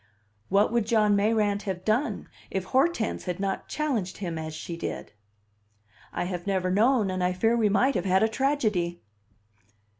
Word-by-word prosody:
What 200 Hz, +3 st, +3 dB
would 235 Hz, -3 st, +1 dB
John 215 Hz, -3 st, +3 dB
Mayrant 205 Hz, 0 st, +2 dB
have 185 Hz, -1 st, -4 dB
done 225 Hz, +7 st, 0 dB, 0.2 s
if 190 Hz, -, -2 dB
Hortense 265 Hz, -, 0 dB
had 180 Hz, 0 st, -3 dB
not 195 Hz, -1 st, -2 dB
challenged 240 Hz, -12 st, -2 dB
him 175 Hz, -4 st, -4 dB
as 155 Hz, 0 st, -5 dB
she 170 Hz, +2 st, -6 dB
did? 165 Hz, -, -6 dB, 1.0 s
I -, -, -2 dB
have 175 Hz, 0 st, -5 dB
never 185 Hz, -2 st, 0 dB
known, 215 Hz, 0 st, +3 dB
and 185 Hz, -1 st, -2 dB
I 180 Hz, 0 st, +1 dB
fear 225 Hz, +6 st, +2 dB
we 220 Hz, -3 st, +2 dB
might 250 Hz, +7 st, +3 dB
have -, -, -2 dB
had 190 Hz, +2 st, +3 dB
a -, -, +4 dB
tragedy. 215 Hz, -, 0 dB
205 Hz, 170 wpm, -27 LUFS, 185-225 Hz, 1.0 s, a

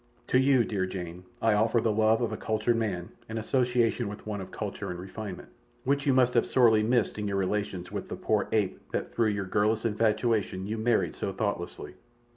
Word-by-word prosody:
"To 130 Hz, -, +4 dB
you, 130 Hz, -2 st, +4 dB
dear 95 Hz, -4 st, -1 dB
Jane, 90 Hz, -1 st, -6 dB, 0.2 s
I 115 Hz, -1 st, +4 dB
offer 110 Hz, +3 st, +3 dB
the 110 Hz, -1 st, +1 dB
love 110 Hz, +2 st, +3 dB
of 120 Hz, -, 0 dB
a -, -, -2 dB
cultured 110 Hz, +2 st, 0 dB
man 100 Hz, -6 st, -2 dB, 0.2 s
and 110 Hz, -, -4 dB
association 120 Hz, 0 st, +1 dB
with 105 Hz, +1 st, -8 dB
one 105 Hz, -2 st, -3 dB
of 95 Hz, -, -8 dB
culture -, -, -5 dB
and 90 Hz, -, -5 dB
refinement, 95 Hz, -, -7 dB, 0.3 s
which 140 Hz, +2 st, 0 dB
you -, -, +5 dB
must 125 Hz, -1 st, +4 dB
have -, -, +3 dB
sorely 115 Hz, -4 st, +5 dB
missed 115 Hz, 0 st, +1 dB
in 105 Hz, -, -2 dB
your 100 Hz, -1 st, -1 dB
relations 95 Hz, -2 st, -2 dB
with -, -, -5 dB
the -, -, -3 dB
poor -, -, 0 dB
ape 100 Hz, -4 st, +1 dB
that -, -, -3 dB
through 115 Hz, -2 st, +2 dB
your 100 Hz, -2 st, -2 dB
girlish 105 Hz, +4 st, +1 dB
infatuation 110 Hz, -3 st, +1 dB
you 110 Hz, +2 st, -3 dB
married 115 Hz, +1 st, +1 dB
so 100 Hz, -, -3 dB
thoughtlessly. 95 Hz, -3 st, -3 dB
110 Hz, 205 wpm, -28 LUFS, 100-115 Hz, 0.3 s, you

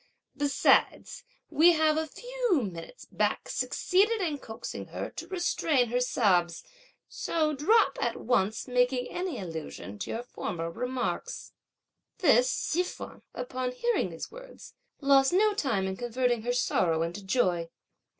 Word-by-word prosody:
Besides, 285 Hz, -1 st, +2 dB, 0.3 s
we 340 Hz, +3 st, +6 dB
have 310 Hz, -1 st, +3 dB
a 315 Hz, 0 st, -1 dB
few 485 Hz, -, -1 dB
minutes 180 Hz, -, -8 dB
back -, -, -1 dB
succeeded 420 Hz, +5 st, +1 dB
in 315 Hz, -7 st, -1 dB
coaxing 220 Hz, -3 st, -7 dB
her -, -, -5 dB
to 335 Hz, -, -8 dB
restrain 330 Hz, -8 st, +1 dB
her 245 Hz, +2 st, +1 dB
sobs, 185 Hz, -9 st, +1 dB, 0.4 s
so 310 Hz, -2 st, -1 dB
drop 305 Hz, +2 st, +3 dB
at 235 Hz, -, -1 dB
once 220 Hz, -3 st, 0 dB
making 250 Hz, 0 st, +1 dB
any 355 Hz, -6 st, -3 dB
allusion 160 Hz, -, -7 dB
to 95 Hz, -, -5 dB
your 230 Hz, -, -3 dB
former 170 Hz, -8 st, -5 dB
remarks!" 250 Hz, +6 st, -4 dB, 0.6 s
This -, -, +4 dB
Hsi 345 Hz, -, 0 dB
feng, 360 Hz, -, -7 dB
upon 250 Hz, 0 st, -3 dB
hearing 475 Hz, -, 0 dB
these -, -, -7 dB
words, -, -, -12 dB, 0.3 s
lost 275 Hz, +1 st, +4 dB
no 420 Hz, +3 st, +4 dB
time 230 Hz, -, 0 dB
in 190 Hz, 0 st, -2 dB
converting 240 Hz, +1 st, 0 dB
her 240 Hz, +2 st, -1 dB
sorrow 165 Hz, -9 st, +1 dB
into 175 Hz, +4 st, -5 dB
joy. 180 Hz, -6 st, +1 dB
255 Hz, 140 wpm, -28 LUFS, 210-335 Hz, 0.6 s, we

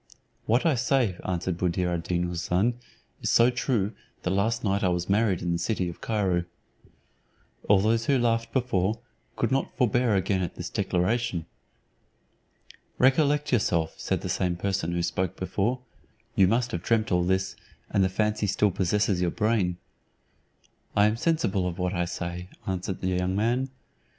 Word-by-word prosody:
"What 120 Hz, +7 st, +2 dB
I 165 Hz, -, +4 dB
say," 130 Hz, -5 st, +1 dB
answered 90 Hz, -1 st, -2 dB
Buddir 90 Hz, 0 st, 0 dB
ad 85 Hz, -, -1 dB
Deen 85 Hz, +1 st, -1 dB
Houssun, 90 Hz, +6 st, 0 dB, 0.5 s
"is -, -, -1 dB
so 120 Hz, +2 st, +5 dB
true 120 Hz, -4 st, 0 dB, 0.3 s
that 90 Hz, -, 0 dB
last 110 Hz, +4 st, 0 dB
night 100 Hz, -1 st, +1 dB
I -, -, +4 dB
was 90 Hz, 0 st, -1 dB
married 100 Hz, -3 st, +2 dB
in 85 Hz, -, 0 dB
the 85 Hz, -, 0 dB
city 90 Hz, -1 st, -1 dB
of 85 Hz, -, -10 dB
Cairo." 95 Hz, -6 st, 0 dB, 1.2 s
All 100 Hz, -, +7 dB
those 115 Hz, +2 st, +1 dB
who 140 Hz, -, +4 dB
laughed 115 Hz, -1 st, +1 dB
before, 110 Hz, -5 st, 0 dB, 0.4 s
could 115 Hz, -, 0 dB
not 135 Hz, +1 st, -1 dB
forbear 120 Hz, -3 st, +2 dB
again 95 Hz, 0 st, +1 dB
at 90 Hz, -, -3 dB
this -, -, -6 dB
declaration. 90 Hz, -1 st, 0 dB, 1.5 s
"Recollect 145 Hz, +2 st, +3 dB
yourself," 85 Hz, -8 st, +1 dB
said -, -, -1 dB
the -, -, -4 dB
same 90 Hz, -1 st, 0 dB
person 95 Hz, -1 st, -1 dB
who 85 Hz, 0 st, 0 dB
spoke 90 Hz, +1 st, -1 dB
before; 100 Hz, +7 st, -1 dB, 0.5 s
"you 95 Hz, -5 st, +5 dB
must 120 Hz, +4 st, +1 dB
have 85 Hz, -, -3 dB
dreamt 110 Hz, +2 st, +1 dB
all 90 Hz, -1 st, +3 dB
this, 95 Hz, +1 st, 0 dB, 0.4 s
and 100 Hz, -, +3 dB
the 95 Hz, -, +2 dB
fancy 105 Hz, +2 st, 0 dB
still 105 Hz, +1 st, +2 dB
possesses 95 Hz, +1 st, +1 dB
your 90 Hz, -, +2 dB
brain." 105 Hz, -4 st, 0 dB, 1.2 s
"I 105 Hz, -, +5 dB
am 105 Hz, +1 st, +2 dB
sensible 115 Hz, -, 0 dB
of 90 Hz, -1 st, -4 dB
what 90 Hz, 0 st, -1 dB
I 85 Hz, -1 st, 0 dB
say," 85 Hz, +1 st, -5 dB, 0.2 s
answered 95 Hz, 0 st, -3 dB
the 95 Hz, -, -1 dB
young 90 Hz, 0 st, 0 dB
man. 120 Hz, +6 st, +1 dB
100 Hz, 165 wpm, -27 LUFS, 90-115 Hz, 1.5 s, All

